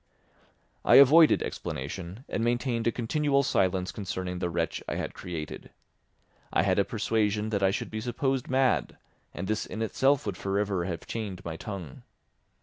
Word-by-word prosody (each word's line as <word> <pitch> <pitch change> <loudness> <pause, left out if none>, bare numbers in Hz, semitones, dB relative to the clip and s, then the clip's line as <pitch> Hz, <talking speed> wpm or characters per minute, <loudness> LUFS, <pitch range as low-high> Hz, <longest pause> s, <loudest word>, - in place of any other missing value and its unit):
I - - +5
avoided 150 +4 +7
explanation 90 - -6
and 115 - -2
maintained 120 0 0
a - - +4
continual 140 +4 +1
silence 95 -5 +1
concerning 90 -2 -4
the 90 - -1
wretch 85 -1 -2
I - - -2
had - - -3
created. 80 -4 -7 0.8
I - - +3
had - - +2
a - - +5
persuasion 105 -1 0
that 100 -2 -1
I 95 - +4
should 95 - -3
be 110 0 -4
supposed 130 +2 -1
mad, 130 -1 +1 0.3
and 90 - -5
this 110 +1 -1
in 110 - -4
itself 135 +5 +2
would 100 -4 -3
for 100 +1 -2
ever 100 -4 0
have 85 -3 -5
chained 105 -5 -5
my 80 -1 -4
tongue. 90 -6 -7
105 Hz, 165 wpm, -28 LUFS, 90-120 Hz, 0.8 s, avoided